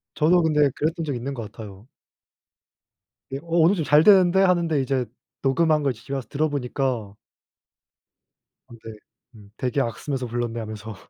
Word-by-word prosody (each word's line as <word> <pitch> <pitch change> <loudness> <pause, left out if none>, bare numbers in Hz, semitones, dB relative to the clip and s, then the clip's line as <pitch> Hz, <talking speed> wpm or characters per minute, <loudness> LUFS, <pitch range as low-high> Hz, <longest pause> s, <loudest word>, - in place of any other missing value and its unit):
저도 170 +3 +3
근데 150 -3 +3
그랬던 165 +2 -2
적 145 - -2
있는 130 +4 -4
것 115 -5 -7
같아요. 105 0 -11 1.4
예 135 - -3
'어 - - -17 0.2
오늘 170 +4 +5
좀 165 - -2
잘 150 +3 +5
되는데.' 190 -2 +5
하는데 170 -5 +2
이제 130 -1 -1 0.4
녹음한 155 +3 +2
걸 135 - +1
집에 120 +4 -10
와서 135 -2 -4
들어 155 +2 0
보니까 125 -6 -3 1.5
어 - - -14
네. 115 - -8 0.4
음 100 -2 -16
'되게 130 +2 -1
악쓰면서 130 +2 -3
불렀네.' 120 0 -3
하면서 110 0 -7
135 Hz, 305 characters per minute, -23 LUFS, 120-155 Hz, 1.5 s, 오늘